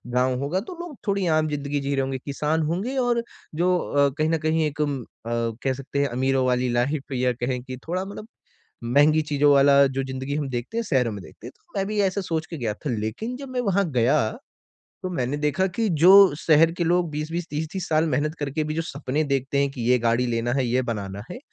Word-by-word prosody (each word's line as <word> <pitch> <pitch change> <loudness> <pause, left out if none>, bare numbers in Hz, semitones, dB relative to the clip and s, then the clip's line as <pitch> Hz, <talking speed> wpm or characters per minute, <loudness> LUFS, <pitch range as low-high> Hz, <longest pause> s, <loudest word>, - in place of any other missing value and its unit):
गाँव 125 0 +2
होगा, 160 +7 0
तो 240 - -8
लोग 345 -4 -7
थोड़ी 200 -1 +1
आम 155 -1 +2
ज़िंदगी 145 -1 -2
जी 140 0 -2
रहें 135 - +1
होगे, 135 0 -3
किसान 150 +3 -1
होंगे 195 - -2
और 245 -2 +2 0.3
जो 180 +2 +2
अ, 140 -3 +2
कहीं 155 0 +1
न 165 - +2
कहीं 160 0 +2
एक 150 0 -3
अ, - - +3 0.4
कह 115 +2 -1
सकते 135 +1 -4
हैं 140 - +2
अमीरों 130 +1 +1
वाली 125 0 +1
लाइफ़ 135 +3 -1
या 125 -1 +1
कहें 125 +1 -3
कि 130 0 -7
थोड़ा 185 +3 -2
मतलब 205 +2 -8 0.6
महँगी 145 +6 +4
चीज़ों 145 0 +4
वाला 140 0 +6
जो 135 0 -2
ज़िंदगी 130 +1 -4
हम 145 -2 -2
देखते 125 - -4
हैं, 230 - +1
शहरों 125 - +1
में 100 -2 -7
देखते 105 - -13
हैं। 125 - -8
तो - - -34
मैं 195 - 0
भी 210 0 -1
ऐसे 195 +1 0
सोच 160 -3 -2
के 165 - -7
गया 115 -5 -1
था, 140 - -5
लेकिन 120 - -3
जब 275 +1 -8
मैं 255 -1 -1
वहाँ 200 -4 +1
गया 125 -1 +3 0.9
तो 185 - -2
मैंने 140 -5 -2
देखा 150 +5 +1
कि 225 -1 +1
जो 175 - +8 0.3
शहर 160 0 +4
के 175 - +1
लोग 175 0 +2
20-20, 160 +3 -3
30-30 160 +4 -4
साल 155 +1 +3
मेहनत 150 +2 0
करके 145 +2 -2
भी 155 0 -3
जो 165 - -1
सपने 145 -2 -2
देखते 140 -1 -1
हैं 140 0 +2
कि 130 -3 -7
ये 125 - +5
गाड़ी 115 +2 +1
लेना 120 0 -1
है, 135 -1 +1
ये 125 +2 +1
बनाना 100 -4 -4
है। 245 - -7
145 Hz, 230 wpm, -24 LUFS, 130-165 Hz, 0.9 s, जो